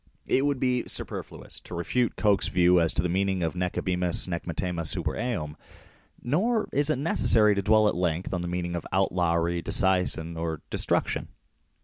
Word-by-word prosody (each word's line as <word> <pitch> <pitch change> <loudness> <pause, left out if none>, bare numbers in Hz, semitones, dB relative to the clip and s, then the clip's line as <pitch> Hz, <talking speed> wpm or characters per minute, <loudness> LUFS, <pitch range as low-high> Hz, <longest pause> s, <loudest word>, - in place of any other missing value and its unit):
It 135 +2 +1
would 140 -2 -1
be 125 -1 -1
superfluous - - -3
to - - -10
refute 120 +8 -1
Coke's 105 -3 +1
view 90 0 +3
as 80 - +1
to - - 0
the - - 0
meaning 95 +1 -1
of 80 0 -2
"nee 90 0 -1
ibimus 90 -1 +1
nee 85 -2 -3
mittemus 85 -1 -1
super - - -1
eum 105 -11 -4 0.4
". - - -32
Nor 210 - 0
is 145 +2 +3
it 155 - +1
necessary 115 -7 +4
to 100 - -1
dwell 110 +2 +3
at - - +1
length 90 0 -2
on 90 - -2
the 85 - -4
meaning 85 0 -3
of 85 - -4
outlawry, 85 -2 0
disseisin, 90 -3 +1
or 80 -2 -4
destruction. - - -1
90 Hz, 180 wpm, -26 LUFS, 85-110 Hz, 0.4 s, necessary